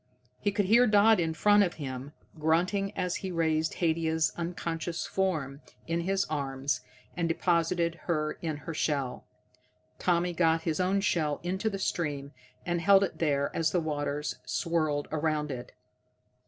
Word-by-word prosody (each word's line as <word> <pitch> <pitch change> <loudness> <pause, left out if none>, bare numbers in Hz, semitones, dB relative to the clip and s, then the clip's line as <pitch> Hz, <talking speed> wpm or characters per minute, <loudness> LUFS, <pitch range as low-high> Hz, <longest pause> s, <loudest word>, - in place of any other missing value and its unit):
He 205 - 0
could 205 0 +1
hear 235 +5 +5
Dodd 210 0 +5
in 160 -2 0
front 205 +5 +5
of 180 -4 +1
him, 135 -1 -6 0.3
grunting 180 +6 +1
as 180 -1 -1
he 190 - -5
raised 160 -2 +1
Haidia's 160 -1 +1
unconscious 170 -1 -3
form 155 -8 -1 0.2
in 165 +1 -1
his 195 +2 0
arms 140 -2 -2 0.3
and 170 -1 0
deposited 170 0 +1
her 155 -3 0
in 160 -3 -2
her 165 - -4
shell. 140 -5 -2 0.7
Tommy 175 0 +1
got 165 -1 +2
his 165 0 -1
own 190 +2 +2
shell 155 -8 0
into 190 +5 -1
the 200 - -4
stream, 145 -7 -2 0.3
and 175 -1 0
held 195 +2 +6
it 195 - -3
there 140 -3 0
as 165 -1 +2
the 175 - +1
waters 150 -2 -2
swirled 155 -4 -1
around 155 -1 0
it. 125 -1 -6
165 Hz, 155 wpm, -29 LUFS, 150-180 Hz, 0.7 s, held